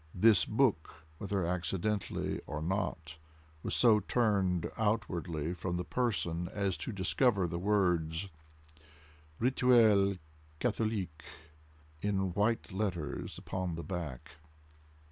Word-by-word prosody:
This 100 -2 +5
book, 105 - 0
whether 100 -3 -1
accidentally 90 +3 -2
or 75 +1 -4
not, 80 -2 -3 0.4
was - - -2
so 115 -3 +6
turned 100 -5 +1
outwardly 90 -7 -1
from 90 0 -3
the 90 - -2
person 90 -8 -1
as 100 -3 -1
to - - -4
discover 100 +1 +2
the 85 0 -3
words 90 -3 +1 1.1
"Rituel 115 -5 +4 0.4
Catholique" 105 -9 -1 0.8
in 95 -3 0
white 105 +3 0
letters 95 -7 -3
upon 95 -3 -3
the 85 - -5
back. 85 -10 -6
95 Hz, 105 wpm, -32 LUFS, 85-105 Hz, 1.1 s, so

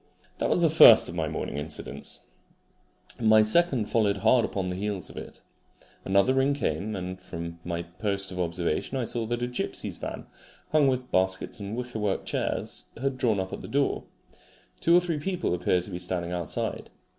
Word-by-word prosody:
That - - 0
was 175 - +2
the 165 - +5
first 115 -8 +9
of - - -6
my 80 -2 -1
morning 70 - -4
incidents. 75 +1 -6 1.0
My 110 -1 +6
second 130 0 +3
followed 105 -2 +1
hard 115 +4 +4
upon 95 -4 -2
the 90 - -3
heels 100 -1 -4
of - - -15
it. - - -9 0.6
Another 100 +6 +3
ring 135 +2 +2
came, 105 - -2
and 95 0 -5
from 85 -2 -7
my 85 -1 -3
post 100 +3 -3
of 90 - -6
observation 85 - -1
I 130 - 0
saw 115 -1 -2
that 120 +1 -2
a - - 0
gipsy's 125 - -4
van, - - -6 0.5
hung 155 -2 +4
with 130 -1 -1
baskets 95 +4 0
and 100 +3 -5
wickerwork 110 -5 -2
chairs, - - -2
had 135 0 -2
drawn 110 -5 +2
up 95 0 -4
at - - -5
the - - -8
door. 140 0 0 0.7
Two 170 - +4
or - - +5
three 170 -4 -2
people 180 - -1
appeared 90 0 +1
to 100 - -6
be 90 - -4
standing 90 -1 -3
outside. 85 -3 -3
105 Hz, 185 wpm, -27 LUFS, 90-125 Hz, 1.0 s, first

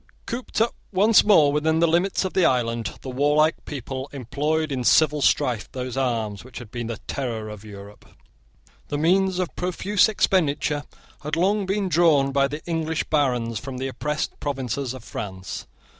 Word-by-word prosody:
Cooped 240 -1 -4
up 230 - +2 0.2
once 210 +3 +5
more 160 -9 +5
within 160 +2 +2
the 165 - +4
limits 175 +4 +1
of 190 - -3
the 185 - +3
island, 115 -5 0
the 130 - -5
warlike 150 +4 +2
people 135 -1 -5
employed 145 +4 -1
in 130 -2 -2
civil 150 +3 +4
strife 120 -5 +1
those 130 -1 -4
arms 115 -7 -1
which 130 0 -12
had 115 -3 -9
been 120 -2 -4
the 115 -2 -4
terror 115 -5 -3
of 105 -1 -9
Europe. 100 -1 -12 0.8
The 145 - -2
means 185 +4 +2
of 185 -2 -2
profuse 185 +4 +2
expenditure 150 -7 +1 0.4
had 150 +1 -2
long 195 +3 +1
been 195 0 0
drawn 160 -6 +4
by 140 0 +3
the 150 +2 -7
English 160 -1 -1
barons 125 -7 +1
from 130 -1 -7
the 135 +1 -3
oppressed 150 +3 -3
provinces 135 -2 -3
of 130 - -10
France. 95 -4 -6
145 Hz, 170 wpm, -24 LUFS, 125-165 Hz, 0.8 s, once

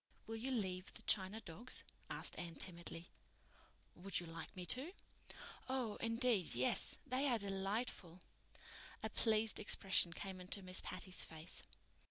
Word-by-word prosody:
"Will 225 0 -3
you 245 +4 -2
leave 190 -7 -1
the - - -8
china 195 +2 +3
dogs?" 210 +8 -3 0.3
asked - - +3
Anne 170 -1 -4
timidly. 170 -1 -3 0.8
"Would 195 +3 +1
you 175 - -5
like 165 0 -7
me 180 -1 -4
to?" 260 - +1 0.8
"Oh, 255 -5 0
indeed, 230 - +3
yes. 125 +2 +2
They 270 +1 +2
are 245 -3 +4
delightful." 195 -2 -1 0.8
A - - -1
pleased 220 -1 +3
expression 190 -4 +4
came 190 +1 -5
into 185 +2 -2
Miss 185 0 +2
Patty's 185 0 -1
face. 160 +1 -5
195 Hz, 140 wpm, -41 LUFS, 175-225 Hz, 0.8 s, are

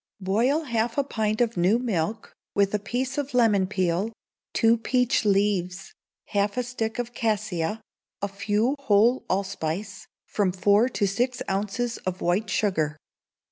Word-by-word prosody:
Boil 235 +11 +1
half 235 -3 -1
a 280 - +3
pint 215 -4 -1
of 235 -1 +1
new 185 +6 +4
milk, 220 -3 -2 0.2
with 200 0 +2
a 210 - +1
piece 255 +6 -2
of 285 -2 -4
lemon 210 -6 +4
peel, 185 +2 0 0.4
two 225 0 +4
peach 250 0 +1
leaves, 195 -2 0 0.4
half 205 +2 0
a 250 - +1
stick 225 -2 -3
of 245 0 -3
cassia, 215 -4 -1 0.4
a 200 - -1
few 210 +6 0
whole 235 -1 +3
allspice, 195 0 -3 0.2
from 200 -3 0
four 205 +6 +3
to 210 - 0
six 245 +6 -1
ounces 210 +5 -1
of 185 0 -4
white 195 +5 0
sugar. 155 -8 0
210 Hz, 145 wpm, -25 LUFS, 195-240 Hz, 0.4 s, new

